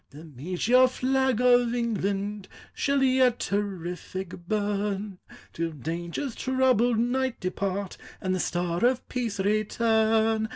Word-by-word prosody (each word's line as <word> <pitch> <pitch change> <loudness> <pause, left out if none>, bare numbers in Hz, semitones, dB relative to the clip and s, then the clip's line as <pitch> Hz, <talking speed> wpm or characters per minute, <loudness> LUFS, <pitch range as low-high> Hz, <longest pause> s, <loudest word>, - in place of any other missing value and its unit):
The 150 +3 -12
meteor 180 - +2
flag 260 -1 +1
of 245 -1 +4
England 205 -3 -2 0.3
Shall 280 -1 +1
yet 255 -2 +3
terrific 185 -2 -4
burn; 205 -1 -2 0.3
Till 165 0 -2
danger's 170 - -4
troubled 255 -3 +2
night 250 +2 0
depart, 195 +1 -3 0.2
And 185 -1 -1
the 185 - -1
star 175 +1 -1
of 250 +1 +2
peace 235 -5 -3
return. 220 +1 +2
215 Hz, 115 wpm, -27 LUFS, 185-245 Hz, 0.3 s, of